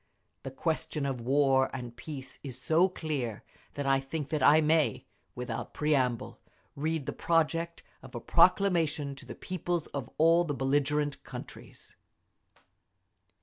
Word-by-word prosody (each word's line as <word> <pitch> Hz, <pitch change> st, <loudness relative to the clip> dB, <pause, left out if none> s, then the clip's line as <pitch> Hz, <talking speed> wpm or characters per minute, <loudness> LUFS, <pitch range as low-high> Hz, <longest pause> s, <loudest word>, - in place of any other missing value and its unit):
The 135 Hz, -, -6 dB
question 150 Hz, +1 st, -2 dB
of 135 Hz, -3 st, -2 dB
War 135 Hz, +1 st, +3 dB
and 120 Hz, -3 st, -6 dB
Peace 135 Hz, -2 st, -8 dB
is 130 Hz, -3 st, -5 dB
so 165 Hz, +7 st, +3 dB
clear 140 Hz, -, -4 dB, 0.3 s
that 145 Hz, -, -3 dB
I 135 Hz, 0 st, +3 dB
think 140 Hz, +2 st, -5 dB
that 155 Hz, -, -1 dB
I 150 Hz, +2 st, +7 dB
may, 155 Hz, 0 st, +2 dB, 0.3 s
without 125 Hz, 0 st, -5 dB
preamble, 130 Hz, -6 st, 0 dB, 0.4 s
read 155 Hz, 0 st, -2 dB
the -, -, -3 dB
project 165 Hz, 0 st, 0 dB, 0.2 s
of -, -, -12 dB
a -, -, -3 dB
Proclamation 160 Hz, -7 st, +3 dB
to 135 Hz, -1 st, -12 dB
the -, -, -7 dB
Peoples 175 Hz, -2 st, -3 dB
of 135 Hz, -3 st, -4 dB
All 165 Hz, +2 st, +5 dB
the 150 Hz, -4 st, -3 dB
Belligerent 145 Hz, +2 st, 0 dB
Countries…." -, -, -10 dB
145 Hz, 140 wpm, -30 LUFS, 135-160 Hz, 0.4 s, I